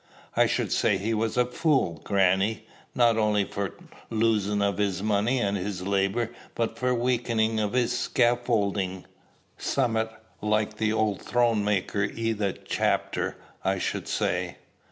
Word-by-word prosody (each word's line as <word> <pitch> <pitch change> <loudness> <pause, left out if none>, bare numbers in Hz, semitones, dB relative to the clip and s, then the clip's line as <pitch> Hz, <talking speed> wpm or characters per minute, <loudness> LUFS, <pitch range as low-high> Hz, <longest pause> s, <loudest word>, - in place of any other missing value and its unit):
"I - - +5
should - - -1
say 100 - +2
he 105 +4 -1
was 110 +1 -1
a 125 - +4
fool, 125 - +1
grannie, 100 +2 +2 0.3
not 120 -2 +4
only 105 -2 +2
for 100 -1 -4 0.3
losin' 110 -2 +1
of 100 0 0
his 100 -2 0
money 110 +4 +2
and 100 -3 0
his 95 -1 -3
labor, 100 +4 0 0.2
but 115 -1 -1
for 125 0 0
weakenin' 115 -2 +1
of 105 0 -1
his 125 -1 +1
scaffoldin', 105 -7 +1 0.5
summat 115 -4 0 0.3
like 105 0 0
the 110 0 +1
old 110 -2 0
throne 120 -3 +2
maker 100 0 0
i' 115 +2 -2
that 100 -3 -3
chapter, - - 0 0.3
I - - +1
should - - -3
say." - - -1
110 Hz, 145 wpm, -27 LUFS, 100-115 Hz, 0.5 s, I